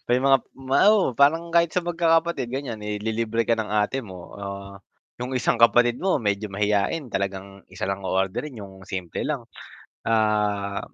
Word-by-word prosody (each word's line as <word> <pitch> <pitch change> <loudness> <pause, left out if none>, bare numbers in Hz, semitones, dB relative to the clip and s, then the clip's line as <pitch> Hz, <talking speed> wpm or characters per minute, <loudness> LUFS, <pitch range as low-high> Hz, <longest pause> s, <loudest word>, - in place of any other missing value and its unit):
may 120 +1 +4
mga 135 0 +5 0.2
ma 135 0 -1 0.2
oo, 190 - +2
parang 165 +4 +3
kahit 170 -1 +3
sa 180 - +1
magkakapatid 165 -6 +1
ganiyan. 130 -6 -4
Ililibre 110 +2 -2
ka 115 - +3
ng 110 -1 -3
ate 105 +5 0
mo 90 -4 -11
o - - -11 0.8
'yong 125 +2 -4
isang 125 - +1
kapatid 120 +1 +5
mo 190 -6 +1
medyo 105 -1 -1
mahiyain, 105 +8 0
talagang 100 0 -4
isa 95 +1 -4
lang 100 0 -3
o-orderin 95 +10 -1
'yong 95 -1 -11
simple 90 -4 -4
lang. - - -2 0.7
Ah, 105 -2 +1
115 Hz, 160 wpm, -24 LUFS, 100-135 Hz, 0.8 s, mga